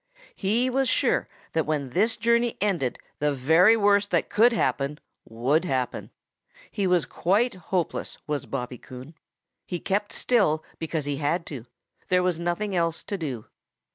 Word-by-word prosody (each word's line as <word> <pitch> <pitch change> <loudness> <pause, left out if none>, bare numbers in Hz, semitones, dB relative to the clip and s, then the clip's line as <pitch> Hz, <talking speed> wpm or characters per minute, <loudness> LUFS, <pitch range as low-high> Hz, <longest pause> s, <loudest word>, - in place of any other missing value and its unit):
He 225 +6 +1
was 265 +1 +1
sure - - +2 0.3
that 160 -2 0
when 145 -4 -1
this 215 - +2
journey 235 +1 +2
ended 175 -12 0 0.2
the 150 0 +2
very 165 - +5
worst 205 -1 +3
that - - 0
could 235 +3 +5
happen 150 -9 0 0.3
would 125 +9 +1
happen. 130 -7 -2 0.6
He 200 -2 0
was 180 -3 +3
quite 215 +8 +1 0.2
hopeless, 180 -3 -2
was 150 -1 -3
Bobby 125 -2 -4
Coon. 130 +5 -11 0.5
He 175 - -4
kept 205 +3 -1
still 190 -11 +2 0.2
because 160 -2 -2
he 145 -1 -2
had 155 +4 0
to. 130 -6 -7 0.4
There 180 0 +3
was 180 -2 0
nothing 175 +4 -2
else 165 -2 0
to 205 - -4
do. 135 - -4
170 Hz, 155 wpm, -26 LUFS, 145-205 Hz, 0.6 s, very